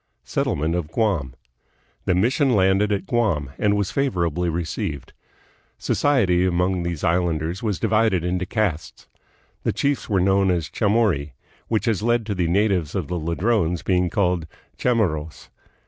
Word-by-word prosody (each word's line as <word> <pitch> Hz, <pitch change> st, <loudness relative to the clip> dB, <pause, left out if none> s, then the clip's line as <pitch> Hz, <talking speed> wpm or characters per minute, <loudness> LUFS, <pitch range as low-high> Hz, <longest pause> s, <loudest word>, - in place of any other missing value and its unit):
Settlement 80 Hz, +3 st, -1 dB
of 85 Hz, -3 st, -3 dB
Guam. 85 Hz, -, 0 dB, 0.7 s
The 90 Hz, -, +2 dB
mission 125 Hz, +6 st, +2 dB
landed 95 Hz, +2 st, +3 dB
at 100 Hz, -1 st, -1 dB
Guam, 95 Hz, -, 0 dB
and 105 Hz, 0 st, +2 dB
was 100 Hz, -2 st, -1 dB
favorably 90 Hz, -, 0 dB
received. 80 Hz, -4 st, -4 dB, 0.6 s
Society 100 Hz, -12 st, +2 dB
among 90 Hz, 0 st, +1 dB
these 85 Hz, -3 st, -4 dB
island 85 Hz, -2 st, +1 dB
ers 85 Hz, +4 st, -4 dB
was 105 Hz, -5 st, -1 dB
divided 110 Hz, -5 st, +2 dB
into 90 Hz, +1 st, -1 dB
castes. 85 Hz, -9 st, -2 dB, 0.6 s
The -, -, 0 dB
chiefs 140 Hz, -3 st, -1 dB
were 100 Hz, -3 st, +2 dB
known 95 Hz, +1 st, +3 dB
as 85 Hz, -3 st, 0 dB
chamorri, 100 Hz, -, +1 dB, 0.3 s
which 110 Hz, -2 st, 0 dB
has 110 Hz, -4 st, 0 dB
led 120 Hz, 0 st, +1 dB
to 105 Hz, -, -2 dB
the 90 Hz, -3 st, 0 dB
natives 95 Hz, -3 st, +1 dB
of 90 Hz, -7 st, -2 dB
the 90 Hz, -, -2 dB
Ladrones 85 Hz, +1 st, 0 dB
being 90 Hz, -1 st, +1 dB
called 90 Hz, -4 st, 0 dB, 0.3 s
"Chamorros." 85 Hz, -11 st, -1 dB
90 Hz, 145 wpm, -22 LUFS, 85-105 Hz, 0.7 s, landed